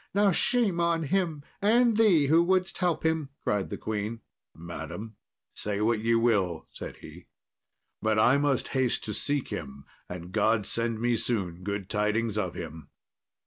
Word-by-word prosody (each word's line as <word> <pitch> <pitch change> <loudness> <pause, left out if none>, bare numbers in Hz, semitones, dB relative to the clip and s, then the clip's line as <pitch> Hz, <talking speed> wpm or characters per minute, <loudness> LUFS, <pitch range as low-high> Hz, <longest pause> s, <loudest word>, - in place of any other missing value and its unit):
"Now 200 -1 +4
shame 200 -1 +1
on 170 -1 +1
him, 160 -2 -1 0.2
and 230 +3 +4
thee 200 -9 +5
who 160 +4 +5
wouldest 185 +1 +1
help 175 -4 0
him," 160 -3 0
cried 105 -2 0
the - - -4
queen. 110 +1 -4 0.3
"Madam, 85 +6 -7 0.4
say 105 -1 -3
what 110 +1 +2
ye 115 +1 +2
will," 100 -8 +1
said - - -8
he; - - -12 0.7
"but 110 0 +1
I 120 +5 +5
must 140 -2 0
haste 130 -3 0
to 105 - -3
seek 145 +5 0
him, 70 +1 -6 0.2
and 90 0 -7
God 110 0 +2
send 115 +1 -1
me 120 0 +1
soon 95 -8 -2
good 100 0 -4
tidings 105 +1 0
of 95 -5 -2
him." 80 -3 -8
115 Hz, 160 wpm, -28 LUFS, 100-160 Hz, 0.7 s, thee